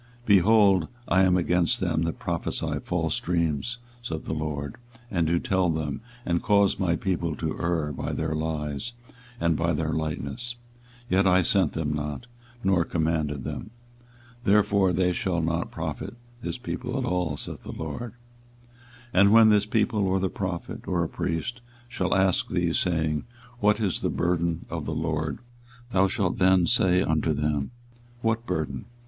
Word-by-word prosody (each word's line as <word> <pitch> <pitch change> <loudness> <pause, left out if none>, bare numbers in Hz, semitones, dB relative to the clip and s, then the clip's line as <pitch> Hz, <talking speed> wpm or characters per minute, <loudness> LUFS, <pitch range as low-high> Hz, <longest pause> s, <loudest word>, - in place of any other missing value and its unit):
24:023:032 - - -26
Behold, 100 -3 +5 0.2
I 95 - +4
am 90 -1 +4
against 90 -1 +2
them 80 - 0
that 85 -1 -1
prophesy - - -2
false 80 -3 0
dreams, 85 - -1 0.2
saith 80 -10 -5
the - - -2
LORD, 75 -2 -3 0.3
and 85 -4 +1
do 85 +2 +2
tell 95 0 +1
them, 80 +1 -2 0.2
and 85 -1 +1
cause 100 -2 +3
my 85 -3 +2
people 85 -3 -1
to 80 -2 -3
err 85 -3 0
by - - -3
their 80 0 -2
lies, 80 +6 -3 0.5
and 85 -1 +2
by 85 +2 +1
their 80 +1 -1
lightness; 80 - -3 0.5
yet 95 -1 +3
I 90 0 +5
sent 90 -3 +2
them 75 -2 -1
not, 75 +7 -4 0.4
nor 95 -3 +3
commanded 80 -5 -1
them: 95 - -5 0.7
therefore 100 -2 +4
they 90 +1 +2
shall 95 -4 -1
not 85 +1 -1
profit - - -5 0.3
this - - -3
people 125 0 -4
at 130 - -1
all, 90 -8 -1
saith - - -6
the - - -8
LORD. 80 +9 -5 1.0
24:023:033 95 - +5
And 100 0 +6
when 110 0 +8
this 105 -1 +4
people, 105 -2 +1
or 95 +1 +2
the 95 0 0
prophet, 95 -3 -5
or 85 -2 +1
a - - -1
priest, 90 +8 -3 0.3
shall 95 -8 -1
ask 95 -1 +2
thee, - - 0
saying, 80 -4 0 0.3
What 105 0 +3
is 100 -5 0
the - - -1
burden 85 -1 0
of - - -4
the - - -3
LORD? 80 -1 -2 0.5
thou 95 -1 +4
shalt 95 -3 -1
then 95 -1 +5
say 95 -4 +3
unto 80 0 +1
them, 75 -2 -1 0.5
What 115 +1 0
burden? 75 -7 -2
85 Hz, 165 wpm, -26 LUFS, 80-100 Hz, 1.0 s, when